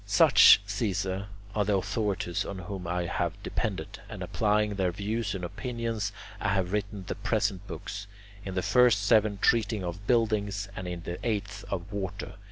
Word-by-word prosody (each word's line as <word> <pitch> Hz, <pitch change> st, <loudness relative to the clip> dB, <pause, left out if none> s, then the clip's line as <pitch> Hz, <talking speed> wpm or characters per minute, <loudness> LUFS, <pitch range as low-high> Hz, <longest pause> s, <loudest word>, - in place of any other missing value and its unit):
Such, -, -, +8 dB
Caesar, 100 Hz, -2 st, -2 dB, 0.3 s
are 105 Hz, -, +2 dB
the 100 Hz, 0 st, +2 dB
authorities 100 Hz, -2 st, -1 dB
on 100 Hz, -, -6 dB
whom 90 Hz, 0 st, -6 dB
I 90 Hz, 0 st, -1 dB
have 85 Hz, -, -1 dB
depended, -, -, -3 dB
and -, -, -6 dB
applying 105 Hz, -1 st, +1 dB
their 95 Hz, -3 st, 0 dB
views 100 Hz, +2 st, -2 dB
and 90 Hz, -, -5 dB
opinions 115 Hz, +1 st, -3 dB, 0.3 s
I -, -, -1 dB
have 95 Hz, -2 st, 0 dB
written 100 Hz, -1 st, -2 dB
the -, -, -3 dB
present 100 Hz, -2 st, -1 dB
books, 100 Hz, 0 st, -6 dB, 0.4 s
in 95 Hz, -1 st, -5 dB
the 95 Hz, -, 0 dB
first 125 Hz, -5 st, +4 dB
seven 105 Hz, -1 st, +4 dB
treating 110 Hz, -1 st, +2 dB
of 90 Hz, +4 st, -5 dB
buildings 105 Hz, -4 st, +1 dB
and 95 Hz, -, -5 dB
in 90 Hz, -1 st, -5 dB
the 85 Hz, -, -5 dB
eighth 105 Hz, -3 st, -2 dB
of 95 Hz, +1 st, -4 dB
water. 95 Hz, -3 st, -4 dB
100 Hz, 170 wpm, -29 LUFS, 95-105 Hz, 0.4 s, Such